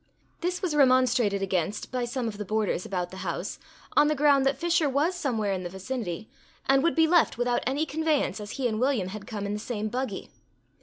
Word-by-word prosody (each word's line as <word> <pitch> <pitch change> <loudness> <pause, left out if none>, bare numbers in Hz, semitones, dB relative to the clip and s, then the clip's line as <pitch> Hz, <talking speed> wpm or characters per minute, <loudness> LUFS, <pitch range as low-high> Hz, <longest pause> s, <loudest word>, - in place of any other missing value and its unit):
This 360 +2 -2
was 340 -5 0
remonstrated 255 -7 +4
against 185 0 -2
by 250 -1 -1
some 240 0 -2
of 210 -2 -5
the - - -2
boarders 210 -3 -1
about 180 -2 -3
the 190 - -9
house, - - -4 0.4
on 295 - +6
the 305 - +2
ground 280 -1 +4
that 270 -1 +1
Fisher 330 -1 +2
was 290 +7 +1
somewhere 225 - -1
in 185 - -2
the 175 - -5
vicinity, 195 0 -5 0.4
and 270 0 +4
would 335 +3 +2
be 325 -1 +5
left 340 -5 +3
without 245 0 +1
any 280 +4 +1
conveyance, 315 -5 0
as 205 - -7
he 260 -2 0
and 220 -2 -2
William 250 -9 +1
had 205 +1 -8
come 205 -2 -4
in 200 - -2
the 210 - -3
same 215 -1 -3
buggy. 255 +3 -4
245 Hz, 215 wpm, -27 LUFS, 205-285 Hz, 0.4 s, on